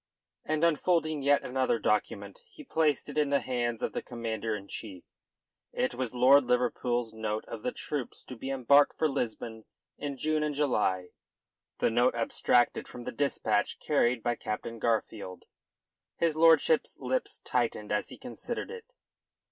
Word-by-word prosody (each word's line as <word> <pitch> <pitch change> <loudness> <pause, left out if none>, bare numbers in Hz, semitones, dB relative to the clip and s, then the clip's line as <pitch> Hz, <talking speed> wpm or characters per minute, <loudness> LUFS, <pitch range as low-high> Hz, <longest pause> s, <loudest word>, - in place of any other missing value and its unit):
And 155 +1 -1
unfolding 160 -2 +2
yet 140 +1 +3
another 130 -2 0
document, 105 - -1
he 380 -9 -13
placed 160 - +1
it 145 +1 -2
in 150 -2 +2
the 140 0 +3
hands 120 -2 -2
of - - -1
the - - -2
Commander 115 -2 -3
in 100 -1 -8
Chief. 100 -5 -6 0.7
It 125 - 0
was 125 -1 -4
Lord 135 +3 +6
Liverpool's 120 -1 0
note 110 -1 -3
of 115 - -7
the 125 - -2
troops 145 -5 -5
to 130 - -9
be 130 +3 -6
embarked 135 +2 +4
for 160 - +2
Lisbon 115 -5 -4 0.3
in 140 -2 -4
June 155 +3 0
and 150 -1 -1
July 105 -10 +1 0.7
the - - +1
note 120 +2 +3
abstracted 120 +1 +2
from 120 - -9
the 125 - -4
dispatch 140 +3 0
carried 120 -1 +1
by 120 - +1
Captain 115 +1 -5
Garfield. 110 -4 -2 0.7
His 165 -2 +1
lordship's 165 - +4
lips - - -2
tightened - - -1
as - - 0
he - - -9
considered - - -6
it. 465 -1 -8
125 Hz, 155 wpm, -29 LUFS, 115-150 Hz, 0.7 s, Lord